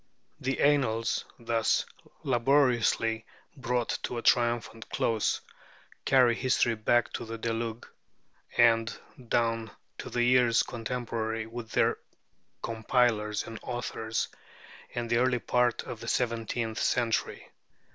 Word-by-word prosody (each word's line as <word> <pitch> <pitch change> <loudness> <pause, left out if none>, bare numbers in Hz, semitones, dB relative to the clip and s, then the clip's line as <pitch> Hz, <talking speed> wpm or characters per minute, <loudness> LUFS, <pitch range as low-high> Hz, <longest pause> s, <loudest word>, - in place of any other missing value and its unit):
The 135 0 -2
Annals, 125 -6 +2
thus 115 -2 +1 0.4
laboriously 120 -3 +2 0.3
brought 125 -3 -1
to 120 - -4
a 115 - -4
triumphant 120 -2 +1
close, 110 -2 0 0.6
carry 125 -3 +5
history 125 -1 +2
back 115 +2 +1
to - - -4
the 115 0 -6
Deluge, 115 0 -3 0.7
and 115 -1 +4 0.3
down 115 -1 +1 0.3
to - - -6
the 120 - 0
years 120 -1 +4
contemporary 115 -1 -3
with 115 0 -8
their - - +2 0.6
compilers 110 -2 +1
and 115 -1 -8
authors, 115 -2 -3 0.7
and 120 -1 -2
the 115 0 +2
early 125 0 +3
part 120 0 +1
of 115 - -7
the 115 - -8
seventeenth 115 -2 -1
century. 120 -3 0
115 Hz, 115 wpm, -29 LUFS, 115-125 Hz, 0.7 s, carry